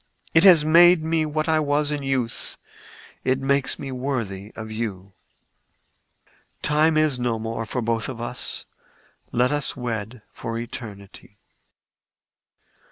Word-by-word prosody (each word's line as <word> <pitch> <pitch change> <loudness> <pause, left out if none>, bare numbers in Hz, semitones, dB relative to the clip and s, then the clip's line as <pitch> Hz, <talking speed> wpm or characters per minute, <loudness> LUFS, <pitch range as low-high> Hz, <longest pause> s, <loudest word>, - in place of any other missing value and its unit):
It 165 - +5
has 175 -6 +8
made 170 +1 +6
me 160 -1 0
what 155 +1 -2
I 160 -1 +3
was 145 0 +1
in 145 -1 -2
youth: 135 -4 -2 0.7
it 130 0 +2
makes 135 0 +1
me 135 - -6
worthy 115 -7 -4
of 110 -1 -7
you. 100 -4 -5 1.5
Time 155 +1 +3
is 155 -4 +2
no 120 -2 0
more 115 0 -4
for 125 +2 -2
both 115 +1 -1
of 125 -3 -7
us. 120 +1 -1 0.7
Let 125 +3 +2
us 145 -2 -1
wed 115 -2 -5
for 115 0 -5
eternity." 105 -4 -9
125 Hz, 130 wpm, -23 LUFS, 115-150 Hz, 1.5 s, has